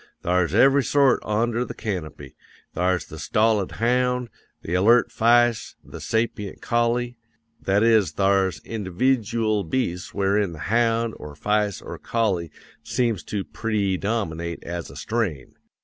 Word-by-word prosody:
Thar's 90 -1 +1
every 135 +4 +5
sort 140 -1 +3
onder 115 +3 0
the - - -7
canopy: 90 -8 -6 0.4
thar's 90 0 0
the - - -10
stolid 105 -3 +1
hound, 125 +1 0 0.3
the 85 - -4
alert 115 +6 +4
fice, 120 0 +2
the - - -10
sapient 110 -3 -2
collie; 120 0 0 0.4
that 100 +2 +2
is 110 -4 +4
thar's 95 -4 +1
individyool 110 0 -1
beasts 90 -9 -2
wherein 100 -1 0
the - - -9 0.2
hound, 115 -1 +2
or 75 -1 -10
fice, 105 +4 -1
or - - -8
collie 100 -8 -1 0.3
seems 115 -6 -1
to 100 -2 -3
preedominate 100 -5 -2
as 85 0 -5
a - - -12
strain. 100 - -3
110 Hz, 130 wpm, -23 LUFS, 95-120 Hz, 0.4 s, every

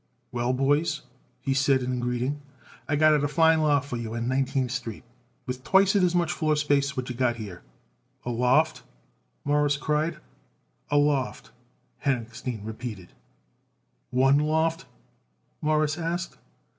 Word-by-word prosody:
"Well, 120 0 0
boys," 145 +4 +1 0.4
he 135 +1 0
said 135 -1 +3
in 125 0 -2
greeting, 125 +4 -2 0.5
"I 145 - +2
got 155 +1 +5
it 150 -1 +2
a - - +2
fine 160 +2 +4
loft 145 -2 +2
for 125 - -3
you 115 -1 -5
on 115 0 -2
Nineteenth 130 -1 0
Street 120 -4 -5 0.4
with 125 0 -5
twicet 195 +4 +4
as 180 -1 +2
much 175 -1 +2
floor 155 -3 +1
space 140 -1 +1
what 130 0 -2
you 125 - -3
got 120 -1 +1
here." 100 -6 -8 0.6
"A 120 - -2
loft!" 130 +7 +2 0.6
Morris 145 0 +2
cried. 155 +2 0 0.7
"A 145 - +2
loft," 145 -2 0 0.5
Henochstein 120 -4 -2
repeated. 110 -4 -7 1.0
"One 135 +2 +4
loft?" 160 +2 0 0.7
Morris 155 +1 +1
asked. 170 +2 -3
140 Hz, 140 wpm, -26 LUFS, 125-155 Hz, 1.0 s, got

